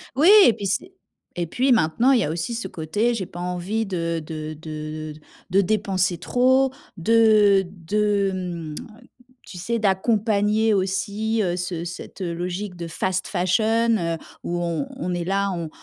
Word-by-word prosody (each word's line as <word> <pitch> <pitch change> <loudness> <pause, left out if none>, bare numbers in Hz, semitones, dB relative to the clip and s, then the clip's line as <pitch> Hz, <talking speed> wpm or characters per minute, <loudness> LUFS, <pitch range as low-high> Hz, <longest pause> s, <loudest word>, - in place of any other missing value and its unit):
Oui, 305 +7 +5 0.2
et 235 - +6
puis 200 - -6
c'est 350 - -2 0.5
et 175 - 0
puis 255 - +1
maintenant, 235 +5 +3
il 250 - +4
y - - +1
a 150 - -1
aussi 170 +8 -3
ce 230 -4 -4
côté 190 +9 -1
«j'ai 195 -6 -3
pas 175 - -10
envie 180 +5 -2
de 170 -4 -2
de 155 0 -6
de 155 0 -6 0.4
de 195 +2 +5
dépenser 190 -3 0
trop», 260 +8 +2 0.3
de 210 0 +5
de, 200 +3 0
hem, 175 -4 -5 0.7
tu 180 - -10
sais, 230 +6 -2
d'accompagner 210 +1 +2
aussi, 205 +3 -1
heu, 175 -3 0
ce 175 -1 -4
cette 175 +3 -8
logique 180 +2 -4
de 170 -1 -6
fast 185 +3 -2
fashion, 220 +5 +2
heu, 165 -3 -2 0.3
où 175 0 -2
on 170 +7 -1
on 180 -8 -3
est 175 -1 -2
là, 195 +2 0
on 170 -3 -4
190 Hz, 165 wpm, -23 LUFS, 175-220 Hz, 0.7 s, et